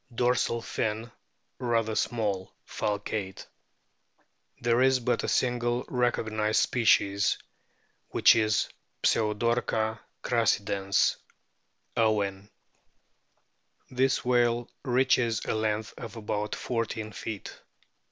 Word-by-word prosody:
Dorsal 120 -1 +1
fin 110 +2 -2 0.5
rather 115 -3 0
small, 105 -5 -1
falcate. 105 -2 -3 1.1
There 120 +1 +2
is 130 0 +4
but 125 0 0
a - - -2
single 120 -1 0
recognised 110 -3 +1
species, 105 -4 +3 0.7
which - - +6
is 110 -2 +2 0.4
Pseudorca 110 0 +1 0.2
crassidens, 100 -4 +1 0.8
Owen. 105 -3 0 0.7
\ - - -44
This 130 0 +1
whale 120 -1 +2
reaches 125 -2 +2
a - - -1
length 110 0 -1
of 115 -2 -8
about 105 -1 -3
fourteen 115 -2 -3
feet. 105 0 -7
115 Hz, 90 wpm, -28 LUFS, 105-120 Hz, 1.1 s, which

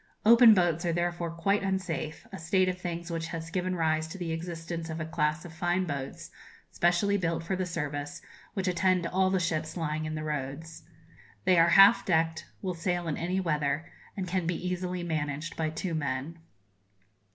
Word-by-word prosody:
Open 230 0 +8
boats 175 -2 +2
are 170 - +1
therefore 175 0 -1
quite 180 +5 0
unsafe, 185 -5 -3
a - - -7
state 185 +3 +2
of 185 0 -2
things 170 -1 -5
which 165 0 -3
has 165 -1 -6
given 185 +1 -1
rise 160 -1 +1
to 165 - -8
the 175 -3 -3
existence 165 0 -5
of 160 +1 -4
a 160 - -2
class 155 +1 -1
of 170 - -9
fine 175 +3 0
boats, 140 -4 -5 0.4
specially 180 +4 +2
built 165 -3 -1
for 190 +3 -1
the 185 -1 -2
service, 145 -3 -4 0.4
which 195 -2 -1
attend 180 0 +2
all 185 +2 +2
the 190 0 +1
ships 160 -1 -2
lying 155 -1 -2
in 155 0 -3
the 155 - -4
roads. 155 +2 -5 0.6
They 180 -2 +5
are 165 +1 +6
half 195 +4 +8
decked, 160 -2 0 0.2
will 185 -1 -1
sail 175 0 -2
in 155 - -1
any 180 +3 -1
weather, 150 -3 -1 0.3
and 190 -2 -3
can 180 -1 -1
be 175 - 0
easily 180 0 -2
managed 155 -1 -3
by 160 -1 -1
two 165 +3 -4
men. 145 +1 -3
170 Hz, 185 wpm, -29 LUFS, 160-180 Hz, 0.6 s, Open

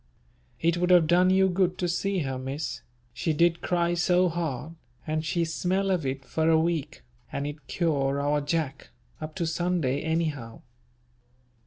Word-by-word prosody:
It 170 +1 +2
would 180 +1 +1
have 175 -3 +6
done 175 +3 +4
you 190 0 +4
good 185 0 +1
to 180 - -1
see 190 +2 0
her 130 -1 -3
Miss, 135 +3 -4 0.3
she 155 +6 -1
did 170 +2 +2
cry 175 -1 +1
so 180 +1 +3
hard, 160 -3 -3 0.3
and 155 0 -1
she 165 +2 0
smell 185 +4 0
of 170 -7 0
it 135 0 -4
for 160 0 0
a 160 -1 +5
week, 160 -2 -2 0.3
and 140 - -3
it 145 -2 -7
cure 140 -5 0
our 145 +1 +1
Jack, 145 -2 -2 0.3
up 155 0 -6
to 175 -3 -1
Sunday 160 -5 0
anyhow. 155 -8 -2
165 Hz, 165 wpm, -27 LUFS, 145-175 Hz, 0.3 s, have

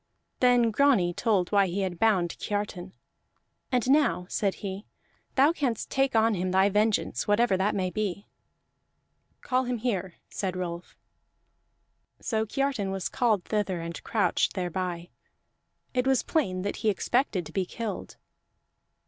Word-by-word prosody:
Then 245 -2 +4
Grani 215 -8 +3
told 195 -4 +1
why 200 -2 +4
he 185 +3 -2
had 180 -3 -3
bound 190 -7 +2
Kiartan. 205 -3 -4 0.8
"And 250 -1 +1
now," 285 -11 +3
said 200 -2 0
he, 195 +2 -5 0.5
"thou 280 +4 +5
canst 265 -8 -2
take 270 -2 +1
on 225 0 +4
him 185 -1 -1
thy 190 +2 +4
vengeance, 210 +1 +1
whatever 205 0 +3
that 190 +3 +1
may 185 -2 -1
be." 205 -1 -3 1.2
"Call 255 0 0
him 245 0 -1
here," 195 -6 -2
said 185 -2 -3
Rolf. 175 -1 -6 1.2
So 220 -1 -1
Kiartan 270 -5 -1
was 190 -1 -3
called 220 -7 +1
thither 205 -4 -1
and 165 0 -6
crouched 215 -2 +1
thereby; 180 -1 -3 0.8
it 250 0 +1
was 265 -2 +3
plain 185 - 0
that 200 - -3
he 220 - +1
expected 210 - 0
to 155 - -10
be 185 +1 -1
killed. 220 -3 -5
205 Hz, 140 wpm, -27 LUFS, 185-235 Hz, 1.2 s, thou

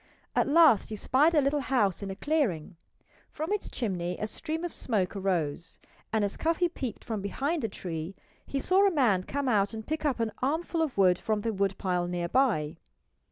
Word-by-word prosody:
At - - +3
last 295 - +5
he 215 - -4
spied 290 +9 +3
a 300 - +5
little 280 +2 +1
house 240 -10 +1
in 200 - -4
a 195 - -4
clearing. 205 - -1 0.5
From 315 +6 -3
its 420 - -2
chimney 180 -6 -2
a - - -1
stream 320 +8 -4
of 350 - -4
smoke 200 -7 0
rose, 170 -5 -2 0.3
and 220 -2 +2
as 200 - -2
Cuffy 335 +2 +1
peeped 260 - -5
from 220 -3 -4
behind 280 - -2
a 225 - 0
tree 170 -1 -5 0.3
he 275 - -3
saw 380 +7 +4
a - - +2
man 240 - +3
come 280 +8 -3
out 210 -2 +2
and 220 0 -7
pick 315 +1 -3
up 285 -5 0
an 225 -1 0
armful 325 +5 0
of 305 -8 -2
wood 185 -2 +4
from 215 -1 -1
the 225 +1 -1
woodpile 190 -2 -1
nearby. 175 - 0
220 Hz, 195 wpm, -28 LUFS, 190-295 Hz, 0.5 s, last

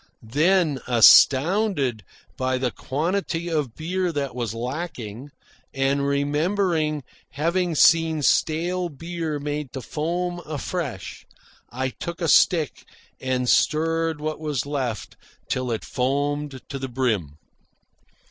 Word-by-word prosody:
Then, 160 -2 +3
astounded 135 - +5 0.3
by 130 0 0
the 125 -1 -1
quantity 170 - -2
of 150 -8 -1
beer 180 +2 -1
that 140 -4 -3
was 120 -3 -3
lacking, 130 -2 -5 0.5
and 140 +1 +1
remembering 155 +2 0 0.3
having 170 +4 0
seen 160 0 +4
stale 175 +6 +1
beer 165 0 -4
made 145 -2 -4
to 130 - -5
foam 175 +5 -2
afresh, 150 - -5 0.4
I 130 +2 -2
took 170 +6 -7
a 170 - -1
stick 160 -2 +3 0.4
and 130 -1 -1
stirred 165 +2 +2
what 155 +1 -3
was 150 -5 -2
left 130 -8 -4 0.3
till 130 -1 -2
it 115 -2 -3
foamed 140 +1 -1
to 135 - -5
the 135 0 -4
brim. 110 - -1
145 Hz, 115 wpm, -24 LUFS, 130-165 Hz, 0.5 s, astounded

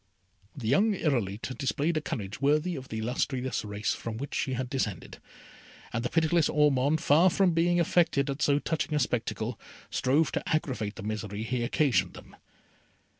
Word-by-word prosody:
The 120 -5 -4
young 205 - +3
Irolite 120 - -1
displayed 145 +4 0
a 155 - 0
courage 105 -4 -5
worthy 155 +5 +2
of 135 -2 -7
the 110 - -4
illustrious 125 +3 -2
race 105 0 -2
from 115 -1 -5
which 140 +4 -6
she 130 - -1
had 130 0 -2
descended, 120 -7 -3 0.7
and 115 0 -1
the 125 - -1
pitiless 165 -1 +2
Ormond, 150 0 +3
far 165 +6 +5
from 185 0 +3
being 175 +1 +2
affected 165 -4 +2
at 140 +1 -3
so 145 -1 +3
touching 155 0 -2
a - - +2
spectacle, 120 -2 -2 0.3
strove 145 +5 +2
to - - -3
aggravate 130 -9 -1
the - - -8
misery 105 0 -4
he 120 +2 -2
occasioned 140 +1 +1
them. - - -13
135 Hz, 170 wpm, -28 LUFS, 115-155 Hz, 0.7 s, far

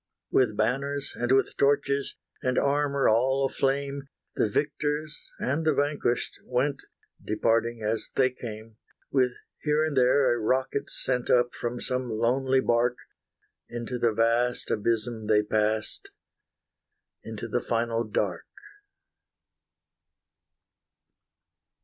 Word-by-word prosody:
With 110 -5 +2
banners 140 +5 -1
and 120 +1 -1
with 135 0 +3
torches, 140 0 +1 0.3
And 125 0 0
armour 140 -1 +2
all 130 +5 +3
aflame, 140 +1 -1 0.3
The 110 - +1
victors 150 +4 -1 0.2
and 140 +5 -1
the 155 -2 +2
vanquished 145 -4 -1
went, 135 +3 -1 0.4
Departing 115 +1 0
as 110 +1 0
they 130 -1 +3
came; 110 -3 -9 0.3
With 130 -3 +2 0.3
here 150 +1 +2
and 155 -2 -2
there 130 0 +4
a 120 - -2
rocket 130 +5 0
sent 125 -2 -1
Up 120 0 +3
from 120 0 -4
some 125 -1 -2
lonely 130 +4 +2
barque: 120 +1 +2 0.7
Into 120 +1 -4
the 120 -1 +3
vast 115 +2 +1
abysm 110 0 -1
they 105 -1 +4
passed, 110 0 -1 1.1
Into - - -6
the - - -1
final 115 0 0
dark. 110 - -2
125 Hz, 115 wpm, -27 LUFS, 115-140 Hz, 1.1 s, there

